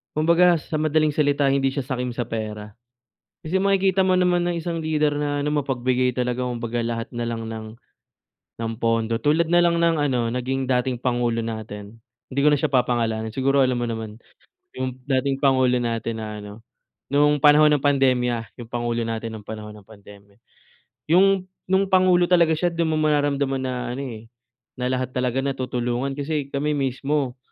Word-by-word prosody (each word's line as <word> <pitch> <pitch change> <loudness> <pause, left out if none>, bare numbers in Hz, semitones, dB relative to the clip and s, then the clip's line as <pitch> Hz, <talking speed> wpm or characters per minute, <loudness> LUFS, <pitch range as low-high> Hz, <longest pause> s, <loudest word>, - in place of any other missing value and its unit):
kumbaga, 170 +3 +4
sa 155 - -6
madaling 155 -1 +1
salita 145 -1 +2
hindi 135 -1 +2
siya 140 -1 -3
sakim 125 -2 -3
sa 120 -1 -4
pera. 105 -2 -5 0.7
Kasi 165 +4 -2
makikita 195 -1 +2
mo 185 -1 +3
naman 180 -1 +2
ang 175 - -1
isang 165 0 -3
leader 150 -2 +1
na 145 -1 -1
ano, 145 - -1 0.2
mapagbigay 125 -1 0
talaga. 125 0 -2
Kumbaga, 120 -1 -3
lahat 115 -1 -3
na 120 0 -2
lang 115 -1 -4
ng 110 -1 -6 1.0
ng 115 0 -2
pondo 115 -1 0
tulad 155 +6 +2
na 175 - +5
lang 170 -1 +2
ng 165 -1 +3
ano, 125 -5 0
naging 130 +1 -2
dating 125 -1 0
Pangulo 120 -2 0
natin. 110 -1 -7 0.3
Hindi 140 - -1
ko 150 - +6
na 145 - +3
siya 150 -2 -1
papangalanan, 115 -3 0
siguro 135 +1 +2
alam 130 -1 +3
mo - - -1
naman. 110 -1 -6 0.6
'Yong 130 0 -4
dating 135 +1 0
pangulo 130 -2 +3
natin 115 -1 -2
na 105 -1 -6
ano, 105 +2 -10 0.5
noong 145 0 +3
panahon 150 +1 +7
ng 145 - -2
pandemya, 125 -5 +1
'yong 115 - -9
pangulo 120 -1 -1
natin 115 0 -4
nung 105 -1 -11
panahon 105 -1 -7
ng 105 -1 -16
pandemya. 100 -1 -16 0.7
'Yong 190 +2 +4 0.2
no'ng 190 +1 +1
pangulo 185 -1 +4
talaga 170 -3 +4
siya 175 +2 0
do'n 165 -1 -1
mo 155 - 0
mararamdaman 145 -3 +1
na 130 -1 -3 0.2
ano, 130 - -5 0.2
eh, 115 - -22 0.5
na 125 - -1
lahat 130 0 -2
talaga 125 +1 -1
natutulungan 125 0 -2
kasi 145 0 -2
kami 140 +2 -2
mismo 135 -1 -1
130 Hz, 175 wpm, -23 LUFS, 115-150 Hz, 1.0 s, panahon